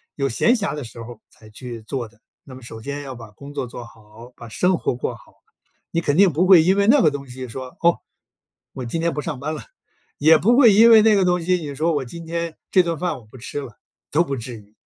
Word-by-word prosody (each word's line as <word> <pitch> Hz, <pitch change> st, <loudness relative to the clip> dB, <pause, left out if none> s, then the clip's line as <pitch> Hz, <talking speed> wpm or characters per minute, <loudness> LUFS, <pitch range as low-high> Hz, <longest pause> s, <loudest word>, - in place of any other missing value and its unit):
有 140 Hz, -1 st, -1 dB
闲 135 Hz, -, +2 dB
暇 205 Hz, -10 st, -2 dB
的 150 Hz, -, -5 dB
时 115 Hz, 0 st, -10 dB
候 120 Hz, +1 st, -8 dB
儿 115 Hz, -, -23 dB
才 110 Hz, -, -18 dB
去 120 Hz, +1 st, -9 dB
做 120 Hz, +1 st, -5 dB
的。 115 Hz, 0 st, -28 dB, 0.2 s
那 130 Hz, -, -12 dB
么 130 Hz, -, -12 dB
首 115 Hz, -2 st, -10 dB
先 140 Hz, +4 st, -5 dB
要 135 Hz, -2 st, -8 dB
把 115 Hz, -3 st, -12 dB
工 140 Hz, +7 st, -12 dB
作 130 Hz, -, -4 dB
做 120 Hz, 0 st, -9 dB
好， 115 Hz, +2 st, -16 dB
把 120 Hz, -, -11 dB
生 180 Hz, +10 st, +1 dB
活 -, -, -2 dB
过 125 Hz, -1 st, -3 dB
好。 115 Hz, -, -19 dB, 0.6 s
你 170 Hz, -, 0 dB
肯 145 Hz, -2 st, 0 dB
定 190 Hz, -3 st, +5 dB
不 170 Hz, +6 st, +2 dB
会 185 Hz, -3 st, +8 dB
因 185 Hz, +4 st, +3 dB
为 200 Hz, +1 st, +2 dB
那 275 Hz, +3 st, +6 dB
个 -, -, +5 dB
东 140 Hz, -1 st, -7 dB
西 130 Hz, +1 st, -8 dB
说， 130 Hz, +2 st, -9 dB
哦， 170 Hz, 0 st, +3 dB, 0.7 s
我 130 Hz, -, -6 dB
今 120 Hz, +8 st, -3 dB
天 170 Hz, 0 st, 0 dB
不 150 Hz, -, -3 dB
上 150 Hz, -4 st, -5 dB
班 150 Hz, +4 st, -4 dB
了。 -, -, -7 dB, 0.5 s
也 155 Hz, +2 st, +6 dB
不 235 Hz, +8 st, +3 dB
会 240 Hz, -7 st, +7 dB
因 225 Hz, +3 st, +7 dB
为 220 Hz, -1 st, +8 dB
那 215 Hz, 0 st, +4 dB
个 195 Hz, -2 st, +2 dB
东 180 Hz, -1 st, +1 dB
西， 180 Hz, +2 st, +1 dB
你 145 Hz, -4 st, -7 dB
说 160 Hz, +4 st, 0 dB
我 140 Hz, -2 st, -2 dB
今 165 Hz, +7 st, -10 dB
天 170 Hz, 0 st, -4 dB
这 185 Hz, -, +5 dB
顿 170 Hz, -1 st, -3 dB
饭 175 Hz, -1 st, -2 dB
我 115 Hz, -, -19 dB
不 110 Hz, +5 st, -15 dB
吃 130 Hz, +4 st, -6 dB
了， 125 Hz, -6 st, -11 dB, 0.3 s
都 160 Hz, +4 st, +3 dB
不 140 Hz, -5 st, -4 dB
至 120 Hz, +1 st, -7 dB
于。 105 Hz, 0 st, -19 dB
145 Hz, 285 characters per minute, -21 LUFS, 120-170 Hz, 0.7 s, 会